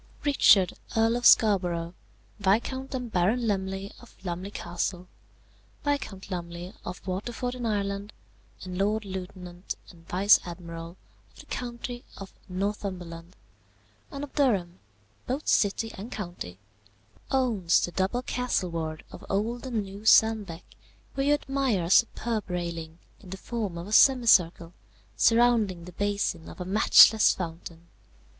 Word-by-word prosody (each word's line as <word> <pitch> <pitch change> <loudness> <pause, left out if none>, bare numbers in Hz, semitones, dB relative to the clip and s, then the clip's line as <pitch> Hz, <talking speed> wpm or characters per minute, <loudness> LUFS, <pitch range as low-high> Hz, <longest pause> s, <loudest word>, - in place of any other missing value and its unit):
"Richard, 205 -10 +5 0.2
Earl 225 +1 +3
of 245 0 +4
Scarborough, 180 -6 +3 0.5
Viscount 240 +7 0
and 250 -3 -5
Baron 210 +7 +1
Lumley 195 -1 -2
of 240 - -17
Lumley 180 +2 -4
Castle, 175 -1 -4 0.8
Viscount 215 -10 -3
Lumley 175 0 -6
of 180 +1 -8
Waterford 230 +6 -3
in 245 -2 -4
Ireland, 200 -1 -2 0.5
and 185 0 -6
Lord 210 +2 0
Lieutenant 185 -1 -7 0.2
and 165 -2 -20
Vice 195 +3 +5
Admiral 170 0 -8 0.3
of - - -20
the - - -17
county 240 0 -6
of 195 -1 -10 0.2
Northumberland 185 -3 -4 0.7
and 280 - -6
of 290 - -8
Durham, 200 - +1 0.5
both 270 +5 -3
city 220 +2 +2
and 215 +6 -8
county, 175 - -6 0.7
owns 225 -10 +2
the 175 - -8
double 195 +8 -1
castleward 170 -12 -2
of - - -11
old 230 +6 -2
and 230 -5 -1
new 195 +1 -10
Sandbeck, 220 -6 +4 0.5
where 275 0 -1
you 290 - +5
admire 270 - -1
a 165 - -4
superb 230 -1 +2
railing, 170 -2 -4 0.2
in 190 - -14
the 190 - -6
form 210 -4 -4
of 170 - -6
a 205 - -9
semicircle, 195 -10 +5 0.4
surrounding 225 -7 +3
the 180 - -9
basin 200 -3 -2
of - - -12
a 180 - -4
matchless 215 +2 +6
fountain. 165 -1 -7
195 Hz, 135 wpm, -27 LUFS, 175-230 Hz, 0.8 s, matchless